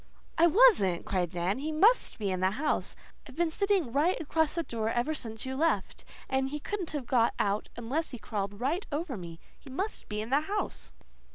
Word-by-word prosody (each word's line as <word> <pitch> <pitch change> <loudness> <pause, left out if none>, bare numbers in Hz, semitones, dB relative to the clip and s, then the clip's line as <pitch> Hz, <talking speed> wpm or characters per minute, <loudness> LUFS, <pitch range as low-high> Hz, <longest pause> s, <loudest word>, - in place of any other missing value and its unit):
"I 335 - +6
wasn't," 340 - +5
cried 180 -3 0
Dan. 175 +7 -1
"He 305 +3 -3
MUST 415 +11 +3
be 205 -3 -1
in 185 - -1
the 185 +1 +3
house. 275 +10 -1 0.3
I've - - -12
been 340 -1 +1
sitting 390 - +1
right 305 +8 +2
across 320 0 0
the 335 - 0
door 225 -6 -2
ever 240 +7 0
since 225 -6 -5
you 260 0 -3
left, 325 +4 0 0.2
and 265 0 0
he 295 - -3
couldn't 380 +2 -4
have 285 -4 -3
got 235 -2 +2
out 205 +1 0
unless 260 +8 -2
he 250 - -7
crawled 205 -2 -4
right 305 +10 -1
over 295 -2 -2
me. 170 -4 -8 0.2
He 280 - -13
must 385 +11 -4
be 210 -1 -3
in 220 +3 -5
the 280 +2 +4
house." 405 +6 -4
270 Hz, 205 wpm, -30 LUFS, 215-325 Hz, 0.3 s, I